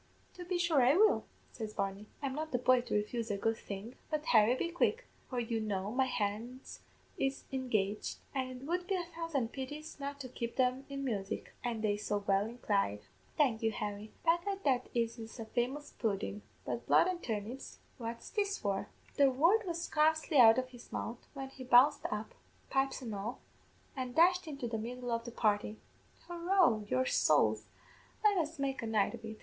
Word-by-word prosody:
"'To 360 Hz, -, -8 dB
be 360 Hz, 0 st, 0 dB
sure 340 Hz, -5 st, +3 dB
I 255 Hz, +4 st, +5 dB
will,' 430 Hz, +2 st, +5 dB, 0.3 s
says 215 Hz, -2 st, -6 dB
Barney. 195 Hz, +1 st, -2 dB, 0.2 s
'I'm 270 Hz, -1 st, -1 dB
not 310 Hz, +2 st, -4 dB
the 250 Hz, -, +2 dB
boy 250 Hz, 0 st, +4 dB
to 240 Hz, -, -3 dB
refuse 225 Hz, +2 st, -1 dB
a 205 Hz, -, 0 dB
good 225 Hz, +3 st, +1 dB
thing; 200 Hz, +4 st, -7 dB, 0.2 s
but, 305 Hz, -1 st, -2 dB
Harry, 220 Hz, +1 st, +5 dB
be 335 Hz, -, -1 dB
quick, 460 Hz, +8 st, +1 dB, 0.2 s
for 250 Hz, -, -2 dB
you 230 Hz, -1 st, -1 dB
know 205 Hz, -2 st, -2 dB
my 260 Hz, +2 st, +2 dB
hands 240 Hz, +2 st, -3 dB, 0.4 s
is 270 Hz, 0 st, 0 dB
engaged, 215 Hz, -6 st, -1 dB, 0.2 s
an' 265 Hz, -2 st, -1 dB
it 255 Hz, 0 st, -8 dB
would 355 Hz, +3 st, -1 dB
be 390 Hz, -, +1 dB
a 355 Hz, -2 st, -2 dB
thousand 320 Hz, -8 st, -1 dB
pities 290 Hz, +3 st, -6 dB
not 280 Hz, 0 st, -5 dB
to 260 Hz, -, -5 dB
keep 235 Hz, -1 st, -5 dB
them 255 Hz, +1 st, +1 dB
in 275 Hz, 0 st, -4 dB
music, 200 Hz, -6 st, -3 dB
an' 235 Hz, -3 st, -2 dB
they 205 Hz, -1 st, +1 dB
so 205 Hz, -1 st, -2 dB
well 200 Hz, +1 st, +3 dB
inclined. 200 Hz, -, 0 dB, 0.4 s
Thank 255 Hz, -7 st, +3 dB
you, 225 Hz, -1 st, +2 dB
Harry; 210 Hz, 0 st, -4 dB
begad 350 Hz, +4 st, +1 dB
that 255 Hz, -3 st, +1 dB
is 230 Hz, 0 st, 0 dB, 0.2 s
a 225 Hz, -, -4 dB
famous 255 Hz, +6 st, -2 dB
pudden; 210 Hz, -1 st, -2 dB, 0.2 s
but -, -, -4 dB
blood -, -, +6 dB
an' 365 Hz, -2 st, -1 dB
turnips, 225 Hz, 0 st, -5 dB, 0.2 s
what's 230 Hz, 0 st, -6 dB
this 405 Hz, -1 st, 0 dB
for?' 195 Hz, -1 st, -1 dB, 0.3 s
"The 280 Hz, -1 st, +6 dB
word 345 Hz, +11 st, +3 dB
was 340 Hz, -1 st, -2 dB
scarcely 315 Hz, -1 st, +2 dB
out 225 Hz, -2 st, +9 dB
of 255 Hz, 0 st, -1 dB
his 245 Hz, -2 st, -14 dB
mouth 235 Hz, +1 st, -5 dB
when 270 Hz, -1 st, -5 dB
he 265 Hz, -1 st, -10 dB
bounced 255 Hz, +4 st, +5 dB
up, 210 Hz, +1 st, -4 dB, 0.4 s
pipes 270 Hz, 0 st, +1 dB
an' 225 Hz, -3 st, -4 dB
all, 210 Hz, +5 st, -4 dB, 0.6 s
an' 255 Hz, -2 st, -3 dB
dashed 360 Hz, +3 st, +4 dB
into 275 Hz, -5 st, -4 dB
the 225 Hz, -1 st, -2 dB
middle 245 Hz, +2 st, -4 dB
of 230 Hz, 0 st, -1 dB
the 240 Hz, -, -6 dB
party. 210 Hz, -1 st, +1 dB, 0.5 s
'Hurroo, 345 Hz, -, +2 dB
your 130 Hz, 0 st, +2 dB
sowls, 110 Hz, -8 st, +3 dB, 0.6 s
let 420 Hz, -1 st, +5 dB
us 320 Hz, 0 st, -2 dB
make 270 Hz, -2 st, -1 dB
a 230 Hz, -, -3 dB
night 215 Hz, -2 st, +2 dB
of 235 Hz, -1 st, -9 dB
it! 220 Hz, -1 st, -7 dB
250 Hz, 190 wpm, -33 LUFS, 220-290 Hz, 0.6 s, out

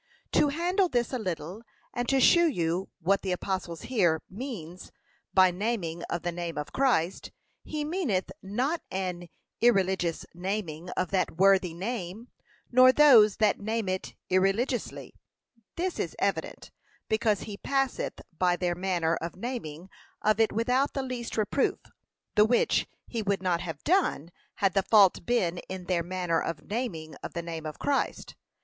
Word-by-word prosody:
To -, -, +4 dB
handle 355 Hz, +5 st, +1 dB
this 240 Hz, -1 st, 0 dB
a 255 Hz, -, -1 dB
little, 180 Hz, 0 st, -4 dB, 0.3 s
and 245 Hz, 0 st, -2 dB
to 270 Hz, -, +3 dB
shew 340 Hz, +6 st, +6 dB
you 175 Hz, -, -1 dB
what 195 Hz, +4 st, +2 dB
the 190 Hz, -, -2 dB
apostle 180 Hz, -1 st, -2 dB
here 170 Hz, -, +1 dB
means 185 Hz, -, -7 dB, 0.4 s
by 185 Hz, -1 st, +5 dB
naming 180 Hz, -4 st, -2 dB
of 170 Hz, -, -3 dB
the 175 Hz, -, -1 dB
name 170 Hz, -2 st, -5 dB
of 150 Hz, -, -5 dB
Christ: 215 Hz, -10 st, +1 dB, 0.3 s
he 300 Hz, -1 st, -4 dB
meaneth 300 Hz, -, -1 dB
not 255 Hz, -, -1 dB
an 180 Hz, -2 st, -4 dB, 0.3 s
irreligious 190 Hz, -7 st, +2 dB
naming 180 Hz, -2 st, -4 dB
of 180 Hz, -, -1 dB
that 185 Hz, -4 st, 0 dB
worthy 190 Hz, -3 st, +4 dB
name, 200 Hz, +2 st, -5 dB, 0.4 s
nor 255 Hz, +1 st, +8 dB
those 250 Hz, -8 st, +7 dB
that 215 Hz, -2 st, +2 dB
name 220 Hz, 0 st, -2 dB
it 185 Hz, 0 st, -3 dB, 0.2 s
irreligiously. 195 Hz, +7 st, 0 dB, 0.6 s
This 360 Hz, +1 st, -2 dB
is -, -, -3 dB
evident, -, -, -2 dB, 0.4 s
because 220 Hz, -2 st, +1 dB
he 210 Hz, -, -6 dB
passeth 270 Hz, +2 st, -1 dB
by 180 Hz, +1 st, +2 dB
their 175 Hz, -1 st, -1 dB
manner 175 Hz, -2 st, 0 dB
of 170 Hz, +1 st, -5 dB
naming 185 Hz, -, -6 dB, 0.4 s
of 215 Hz, +1 st, +3 dB
it 225 Hz, -, +4 dB
without 250 Hz, +5 st, +1 dB
the 275 Hz, -, -2 dB
least 250 Hz, -3 st, -5 dB
reproof, 215 Hz, +5 st, +1 dB, 0.6 s
the 210 Hz, -, +6 dB
which 240 Hz, +2 st, +2 dB, 0.2 s
he 230 Hz, -, -3 dB
would 200 Hz, -2 st, -1 dB
not 175 Hz, -2 st, +1 dB
have 165 Hz, -5 st, -6 dB
done 325 Hz, -, +1 dB, 0.2 s
had 195 Hz, -2 st, +1 dB
the 195 Hz, -, +3 dB
fault 195 Hz, -4 st, +4 dB
been 180 Hz, -8 st, +1 dB
in 185 Hz, -1 st, -5 dB
their 180 Hz, -2 st, +1 dB
manner 175 Hz, -1 st, -1 dB
of 165 Hz, -, -4 dB
naming 200 Hz, -9 st, -4 dB
of -, -, -7 dB
the 170 Hz, -, -4 dB
name 165 Hz, -2 st, -5 dB
of 155 Hz, -, -7 dB
Christ. 285 Hz, -1 st, -1 dB
195 Hz, 155 wpm, -28 LUFS, 175-240 Hz, 0.6 s, nor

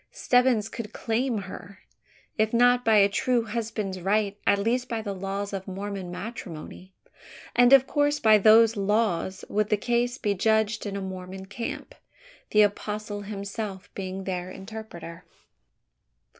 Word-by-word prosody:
Stebbins 245 Hz, -4 st, +2 dB
could 225 Hz, -1 st, -7 dB
claim 235 Hz, +1 st, -1 dB
her 195 Hz, +1 st, -10 dB, 0.6 s
if 220 Hz, 0 st, +1 dB
not 245 Hz, +1 st, +4 dB
by 225 Hz, -2 st, +4 dB
a 200 Hz, -1 st, +6 dB
true 240 Hz, +4 st, +1 dB
husband's 215 Hz, -4 st, -3 dB
right, 200 Hz, +2 st, +1 dB
at 200 Hz, -, +5 dB
least 245 Hz, +5 st, 0 dB
by 230 Hz, -, -2 dB
the 205 Hz, -2 st, -4 dB
laws 195 Hz, +1 st, -4 dB
of 190 Hz, 0 st, -5 dB
Mormon 195 Hz, -1 st, -5 dB
matrimony; 185 Hz, -2 st, -8 dB, 0.6 s
and 245 Hz, +1 st, +6 dB
of 270 Hz, -1 st, +8 dB
course 290 Hz, +1 st, +1 dB
by 215 Hz, -1 st, +6 dB
those 225 Hz, +2 st, +6 dB
laws 200 Hz, -3 st, 0 dB
would 210 Hz, 0 st, 0 dB
the 210 Hz, -, +2 dB
case 240 Hz, +3 st, 0 dB
be 205 Hz, -, 0 dB
judged 220 Hz, +2 st, +1 dB
in 200 Hz, -, -4 dB
a 200 Hz, -, -3 dB
Mormon 190 Hz, 0 st, -7 dB
camp 230 Hz, +4 st, -6 dB, 0.6 s
the 210 Hz, 0 st, +5 dB
apostle 210 Hz, 0 st, -2 dB
himself 200 Hz, -1 st, -6 dB
being 190 Hz, 0 st, -5 dB
their 185 Hz, -1 st, -4 dB
interpreter! 190 Hz, -4 st, -9 dB
210 Hz, 145 wpm, -26 LUFS, 195-230 Hz, 0.6 s, of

